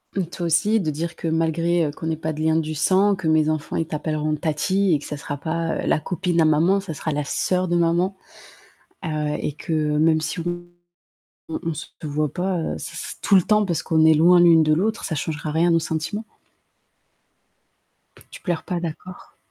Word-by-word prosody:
Mmh, 190 -2 0
toi 175 +1 -6
aussi 170 +7 +2
de 155 -4 -1
dire 165 +3 -4
que 165 - -5
malgré, 165 +1 +1
heu, 145 - -2
qu'on 160 +2 -7
n'ait 160 -1 -1
pas 160 0 -3
de 155 - -6
lien 160 0 +2
du 155 -1 -2
sang, 190 +6 +3
que 185 -3 -4
mes 155 -1 +3
enfants 155 -1 -2
ils 165 - 0
t'appelleront 155 0 -2
tatie 180 +5 +1
et 150 - +2
que - - -11
ça - - -5
sera 145 0 -5
pas, 165 +3 -2
heu, - - -3
la - - +2
copine 175 -1 0
à - - +4
maman, 165 +6 +3
ça 190 -4 -6
sera 155 +2 -3
la 150 +1 -1
sœur 180 +5 -1
de 175 - +2
maman, 175 +3 +1 0.9
heu - - -2 0.3
et - - -2
que 160 - -6
même 155 +1 +2
si 160 +2 -3
on 175 +1 -4 0.9
on 160 - -3
on 165 -2 -2
se 155 - -7 0.2
voit 150 0 -1
pas, 185 0 -1
heu, 160 - -3
c - - -8 0.3
tout 200 - +3
le 190 - +7
temps 210 +3 +2
parce 170 -4 -2
qu'on 160 -1 +3
est 160 - +7
loin 175 +3 +6
l'une 170 -2 +6
de 155 0 +3
l'autre, 215 +8 0
ça 160 - -2
changera 150 +1 -3
rien 165 +3 +2
nos 165 - +4
sentiments. 160 +7 -3 2.0
Tu - - -12
pleures 175 -4 -2
pas, 175 -2 -3
d'accord. 175 +2 -8
165 Hz, 210 wpm, -22 LUFS, 155-175 Hz, 2.0 s, le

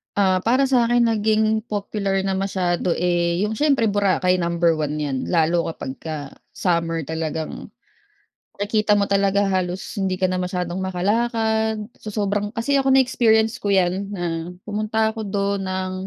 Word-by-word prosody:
Ah, 190 -2 +3
para 250 +7 +2
sakin 240 -2 +3
naging 220 0 +2
popular 200 -1 -2
na 195 - -1
masyado 185 -2 0
eh 175 -1 +1
yung 210 - -1
siyempre 275 +2 +2
Boracay 195 -3 +2
number 170 0 +2
1 150 0 -1
yan 145 -3 -2
lalo 170 0 +2
kapagka 145 0 -6 0.2
summer 165 -3 0
talagang, 160 0 -4 0.9
nakikita 210 0 +1
mo 200 - +2
talaga 200 0 +2
halos 185 -1 -1 0.2
hindi 190 -1 0
ka 185 - -1
na 185 0 +1
masyadong 180 0 -3
makalakad, 220 +3 0 0.2
sa 215 - -8
sobrang 205 0 -1
kasi 275 +4 +2
ako 270 - 0
na 265 - +6
experience 225 -1 +2
ko 205 - -3
yan 190 0 +1
na 185 -4 -4 0.4
pumunta 215 +1 0
ako 225 - -7
dun 200 -1 -1
ng 185 0 -2
195 Hz, 150 wpm, -22 LUFS, 180-220 Hz, 0.9 s, na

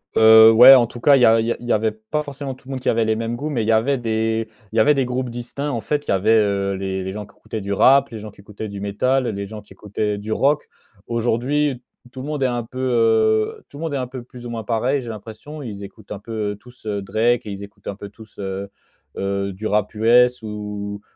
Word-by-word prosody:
Heu, 110 0 +8
ouais 125 +4 +10
en 120 -2 +5
tout 120 +1 -10
cas, 140 +3 +5
il 130 - +3
y - - +7
a 115 0 +5
il 110 - 0
y 120 - +1
a - - -2
il 120 - -11
y - - +1
avait 110 +1 +1
pas 110 +8 -4
forcément 140 -2 -6
tout 130 - -19
le - - -7
monde 130 - -3
qui - - 0
avait 115 0 +2
les 110 0 +1
mêmes 115 +1 -3
goûts, 150 +5 -4
mais 120 -6 -1
il - - -4
y - - +3
avait 120 +6 +2
des 110 -1 -1 0.2
il - - -9
y 115 - +3
avait 150 +7 +5
des 135 -2 0
groupes 125 0 -3
distincts. 120 +5 -5
En 115 -3 -3
fait, 145 -1 -2
il - - -8
y - - +3
avait, 100 +4 +2
heu, 100 -2 +1
les 95 0 -3
les 95 - -4
gens 105 0 -6
qui 100 - -22
écoutaient 110 - -7
du 100 +1 -3
rap, 135 +6 +5
les 115 - -8
gens 105 0 -8
qui 100 - -17
écoutaient 105 +1 -8
du 100 0 -7
métal, 130 +7 0
les 100 -2 -4
gens 105 +1 -8
qui - - -17
écoutaient 105 0 -3
du 105 +2 -6
rock. 145 +5 +1 0.4
Aujourd'hui, 120 +4 0 0.3
tout 130 - -8
le 140 - -7
monde 150 -3 -2
est - - +3
un 120 -2 -1
peu, 125 +3 -12
heu, 110 -3 +2
tout 140 - -12
le - - -8
monde 160 -3 -3
est - - 0
un 130 - -2
peu 130 -1 -8
plus 125 0 -13
ou 120 - -6
moins 115 -1 -5
pareil, 125 +5 0
j'ai 120 - -8
l'impression. 115 +8 -9
Ils 100 -4 -7
écoutent 105 +1 -13
un 100 - -5
peu, 105 -1 -4
heu, - - -6
tous, 125 0 -19
heu, 100 -2 -2
Drake 110 +4 0
et - - -4
ils 100 +1 -7
écoutent 100 - -14
un 100 - -4
peu 100 0 -9
tous, 110 +1 -17
heu 95 0 -5 0.5
heu, 100 0 -2
du 105 +4 -8
rap 105 -1 0
US 120 +2 +4
ou 105 -1 -6
110 Hz, 285 wpm, -21 LUFS, 105-125 Hz, 0.5 s, ouais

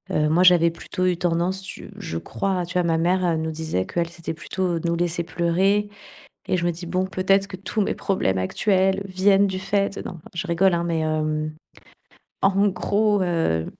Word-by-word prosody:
heu, 150 0 +2
moi 175 +4 +4
j'avais 175 -2 +6
plutôt 185 +2 -4
eu 180 -1 +2
tendance, 175 +2 0
tu 190 - -8
je 80 - -5
crois, 180 - -2
tu 180 - -9
vois, 180 - +3
ma 165 -1 +1
mère, 180 +3 +1
elle 165 -2 +1
nous 160 0 -2
disait 155 -12 -2
qu'elle, 170 -1 -2
c'était 170 -1 -6
plutôt 175 +1 -2
nous 170 +1 -1
laisser 170 0 -1
pleurer 185 +4 +1 0.6
et 185 - +2
je 175 - -1
me - - +2
dis: 175 +1 -8
«Bon, 185 +2 0
peut-être 195 +1 +1
que 185 - -7
tous 200 +3 -3
mes - - -1
problèmes 95 - 0
actuels 190 - +1
viennent 195 +2 +4
du 190 -1 -3
fait» 195 +1 -1
non, - - -5
enfin 165 -3 -12
je 170 +2 -3
rigole, 180 +1 +3
hein, 170 - 0
mais 165 -1 -1
hem 155 -1 -1 0.9
en 195 +1 +4
gros 205 +2 +1
heu 165 - 0
175 Hz, 200 wpm, -23 LUFS, 165-190 Hz, 0.9 s, j'avais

